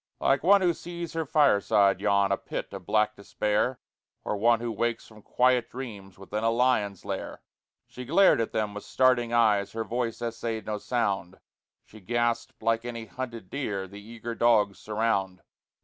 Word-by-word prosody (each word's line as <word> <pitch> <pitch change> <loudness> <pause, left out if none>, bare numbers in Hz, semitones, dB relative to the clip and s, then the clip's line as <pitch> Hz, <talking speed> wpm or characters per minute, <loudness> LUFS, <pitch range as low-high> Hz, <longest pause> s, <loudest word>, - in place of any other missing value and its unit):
Like 135 0 +2
one 200 +4 +5
who 175 -2 +3
sees 170 0 -7
her 165 -2 -2
fireside 105 -9 +3
yawn, 100 -1 +2
A 100 - +2
pit - - -6
of - - -8
black 110 0 +2
despair, 105 +5 -1 0.4
Or - - -2
one 115 +3 +3
who 120 0 -3
wakes 120 0 -2
from 110 -1 -16
quiet 125 +1 +2
dreams 105 -7 -8
Within 105 +3 -5
a 115 - +3
lion's 115 -5 +1
lair, - - -5 0.4
She 125 - -9
glared 170 +1 +4
at 115 - -2
them 105 -2 -1
with 105 - -7
starting 125 -2 +2
eyes, 105 -4 +2
Her 115 0 -2
voice 115 0 -3
essayed 115 -1 -4
no 105 -1 -3
sound; 100 -6 -2 0.5
She 110 - -15
gasped 120 +3 -2
like 115 0 +1
any 115 -2 -6
hunted 115 -4 -7
deer 105 -9 -3
The 100 +2 -11
eager 115 +2 -7
dogs 110 -4 +2
surround. 105 -4 -1
115 Hz, 170 wpm, -27 LUFS, 105-120 Hz, 0.5 s, one